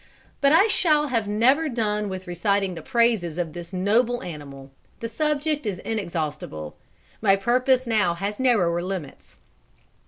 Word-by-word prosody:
But 280 -1 +4
I 330 +6 +6
shall 305 -8 +3
have 230 -5 0
never 260 +10 +3
done 210 -4 -1
with 185 -1 -6
reciting 195 +2 0
the 170 - -7
praises 230 -10 +1
of 170 -3 -3
this 175 0 -8
noble 225 +6 +1
animal; 140 -5 -9 0.3
the 230 - -4
subject 300 +2 -1
is 195 -3 -2
inexhaustible. 155 - -4 0.5
My 195 -3 +5
purpose 250 +5 +2
now 210 -7 +1
has 200 +4 -4
narrower 190 -10 +2
limits. 180 -6 -7
210 Hz, 145 wpm, -24 LUFS, 175-245 Hz, 0.5 s, I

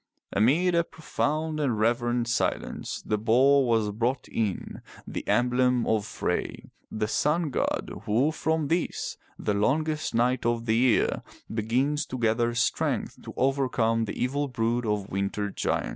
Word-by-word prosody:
Amid 150 - +3
a 170 0 +3
profound 155 -1 -2
and 130 -7 0
reverent 120 +2 +1
silence 115 +1 -2
the 105 - -1
boar 130 +5 +4
was 110 -3 +2
brought 120 +5 -1
in, 105 -5 -3 0.2
the - - -5
emblem 125 0 +2
of 110 -2 0
Frey, - - -3 0.2
the 110 0 -1
sun 150 +6 +1
god, - - -1
who 125 +9 +2
from 160 -1 -1
this, 170 +3 -1 0.2
the 105 - -1
longest 150 +8 0
night 125 +2 +2
of 120 0 0
the 110 -1 +2
year, 120 0 +3 0.3
begins 130 +7 0
to 130 - -5
gather 120 0 +1
strength 115 - -1
to - - -9
overcome 125 -4 +1
the - - -6
evil 140 +3 0
brood 120 -1 -1
of 105 -2 -1
winter 100 +1 -2
giants. - - -1
120 Hz, 145 wpm, -27 LUFS, 110-140 Hz, 0.3 s, boar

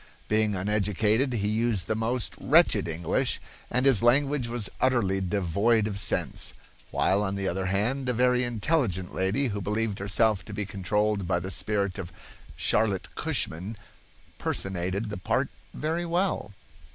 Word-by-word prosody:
Being 110 -1 +2
uneducated, 105 +5 +1
he 105 -3 0
used 110 -4 +1
the 110 - 0
most 115 0 -1
wretched - - +4
English, 85 0 0 0.3
and 125 +2 +1
his 130 -6 +5
language 135 +2 +3
was 115 -3 0
utterly 110 -7 +2
devoid 100 +4 +1
of 100 -2 -2
sense. - - -1 0.3
While, 100 +2 +2
on 100 -1 -1
the 100 -1 -2
other 95 +1 -1
hand, 120 +8 0
a - - +1
very 125 +1 +3
intelligent 115 - 0
lady 105 +9 +1
who 100 -1 -3
believed 105 +1 -1
herself 100 0 +2
to 105 - -7
be 105 - -2
controlled 100 +1 0
by 85 -1 +1
the 95 +3 -5
spirit 100 -1 +1
of 90 -2 -6 0.4
Charlotte 105 -3 0
Cushman 95 +8 -2 0.6
personated 95 +3 -2
the 105 - -4
part 90 - 0 0.2
very 165 +3 -2
well." 175 - 0
105 Hz, 150 wpm, -27 LUFS, 95-120 Hz, 0.6 s, his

